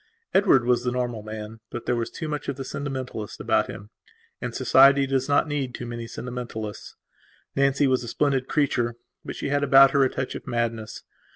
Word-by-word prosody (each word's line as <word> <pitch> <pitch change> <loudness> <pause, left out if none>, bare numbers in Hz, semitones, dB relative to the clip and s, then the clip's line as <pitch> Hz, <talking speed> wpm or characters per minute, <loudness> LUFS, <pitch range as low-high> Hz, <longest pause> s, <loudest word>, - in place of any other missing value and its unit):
Edward 190 - +4
was 120 0 +2
the 125 - 0
normal 120 -3 -2
man, 110 +1 -8
but 120 - -6
there 120 - +1
was 115 -1 -2
too 160 - -6
much 150 -1 -4
of - - -2
the 135 0 -6
sentimentalist 130 -6 -5
about - - +1
him; 105 +1 -9 0.5
and - - -4
society 135 +1 +6
does 135 0 -1
not 145 +2 +3
need 140 -4 -2
too 120 - -6
many 120 -1 -6
sentimentalists. 115 -3 -6 0.6
Nancy 140 +1 +3
was 130 -2 +2
a - - -7
splendid 135 +1 0
creature, 125 -5 0 0.3
but - - -6
she - - -4
had 145 0 +1
about 135 -1 +7
her 140 -1 +4
a 130 - +3
touch 130 0 -4
of - - -8
madness. 115 -2 -3
125 Hz, 195 wpm, -25 LUFS, 120-140 Hz, 0.6 s, about